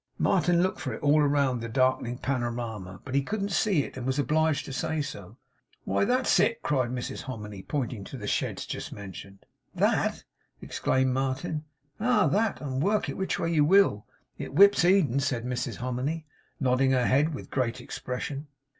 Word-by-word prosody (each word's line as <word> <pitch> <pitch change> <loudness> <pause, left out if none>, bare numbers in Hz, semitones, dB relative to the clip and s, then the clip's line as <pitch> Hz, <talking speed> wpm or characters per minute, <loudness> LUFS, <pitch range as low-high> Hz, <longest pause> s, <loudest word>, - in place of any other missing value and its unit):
Martin 175 -2 +3
looked 185 - -1
for 130 -5 -3
it - - -11
all 150 +1 +5
round 140 -4 +2
the 115 - -5
darkening 130 -1 +1
panorama; 120 -8 -3
but 130 - -6
he 140 - +3
couldn't 200 +6 -3
see 180 -5 +2
it, - - -9
and 130 - -5
was 130 +1 0
obliged 155 +1 +1
to 135 - -7
say 160 +3 -1
so. 105 -7 -6 0.5
'Why - - +1
that's 255 +3 +3
it!' 230 - +2
cried 130 -5 +1
Mrs 125 0 -4
Hominy, 105 -6 -7
pointing 120 -3 -3
to 135 - -8
the 105 - -7
sheds - - -1
just - - -5
mentioned. 100 0 -10 0.3
'THAT!' - - +1 0.4
exclaimed 130 -1 0
Martin. 135 +4 -2 0.3
'Ah! 245 +4 +3
that; 215 +1 +1
and 135 -2 -2
work 205 +5 +1
it - - -3
which 190 - -1
way 170 - -1
you 150 -2 +4
will, 165 - +4 0.3
it - - -6
whips 200 0 +7
Eden,' 175 -8 +4
said 130 -4 -1
Mrs 125 +1 -2
Hominy, 130 +6 -3 0.3
nodding 130 0 +2
her 125 -1 +2
head 145 +5 +2
with - - -9
great 125 -2 -1
expression. 135 +3 -5
135 Hz, 180 wpm, -28 LUFS, 125-160 Hz, 0.5 s, whips